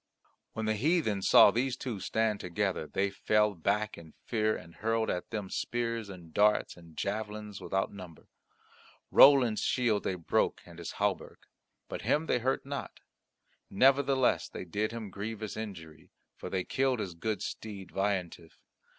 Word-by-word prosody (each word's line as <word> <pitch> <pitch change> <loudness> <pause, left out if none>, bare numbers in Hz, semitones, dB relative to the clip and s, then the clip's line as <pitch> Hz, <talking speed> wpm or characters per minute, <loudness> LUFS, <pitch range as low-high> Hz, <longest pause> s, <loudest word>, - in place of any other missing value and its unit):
When 110 - -3
the 110 - +2
heathen 115 - +1
saw 100 - +7
these 125 +3 -1
two 120 -6 -4
stand 110 +2 0
together 90 -2 -2
they 100 +4 -1
fell 105 +1 +2
back 100 +4 -1
in 80 -2 -15
fear 110 -2 +1
and 85 +1 -13
hurled 115 0 0
at 90 - -4
them 105 -4 -5
spears 115 -3 -2
and 85 -4 -11
darts 105 +1 +3
and 85 -2 -16
javelins 105 0 -4
without 95 +1 -1
number. 90 -5 -11 0.8
Roland's 130 -6 +7
shield 115 -5 +1
they 95 - -1
broke 85 -3 0
and 85 -1 -13
his 85 - -6
hauberk; 100 -2 -2 0.4
but - - -6
him 155 +2 +1
they 125 - +1
hurt 130 +3 -1
not; 140 0 -6 0.7
nevertheless 135 +3 +3
they - - -7
did 105 +5 -2
him 115 -1 -5
a 100 - -10
grievous 110 +2 -5
injury, 85 -8 -8 0.3
for - - -7
they 95 -1 -1
killed 130 +3 +1
his 95 -4 -4
good 100 +3 -3
steed 100 -4 -7
Veillantif. 95 -4 -2
105 Hz, 160 wpm, -30 LUFS, 95-115 Hz, 0.8 s, saw